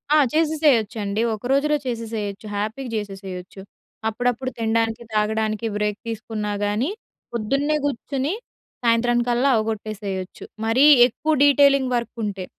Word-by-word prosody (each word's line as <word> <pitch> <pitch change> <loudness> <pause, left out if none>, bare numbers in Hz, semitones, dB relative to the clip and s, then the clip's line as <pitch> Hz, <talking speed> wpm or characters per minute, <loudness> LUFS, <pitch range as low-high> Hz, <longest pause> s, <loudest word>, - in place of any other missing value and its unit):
ఆ! - - +6 0.2
చేసేసేయొచ్చండి. 245 -10 +2
ఒక 215 - -7
రోజులో 295 +2 +3
చేసేసేయొచ్చు, 225 -4 -4
హ్యాపీగా 220 +5 -3
చేసేసేయొచ్చు. 195 -2 -7 0.5
అప్పుడప్పుడు 245 +3 -1
తినడానికి, 225 +1 0
తాగడానికి 215 +1 0
బ్రేక్ 210 0 -1
తీసుకున్నా 215 -1 -4
గానీ 210 +8 0 0.4
పొద్దున్నే 275 +7 0
గుర్చొని 280 +3 -2 0.5
సాయంత్రం 240 +1 +3
కల్లా 245 +3 +2
అవగొట్టేసేయచ్చు, 215 -3 -4 0.2
మరీ 245 +6 +4 0.2
ఎక్కువ 305 +6 -2
డీటైలింగ్ 280 -2 +5
వర్కుంటే. 215 -5 -3
225 Hz, 105 wpm, -22 LUFS, 210-260 Hz, 0.5 s, ఆ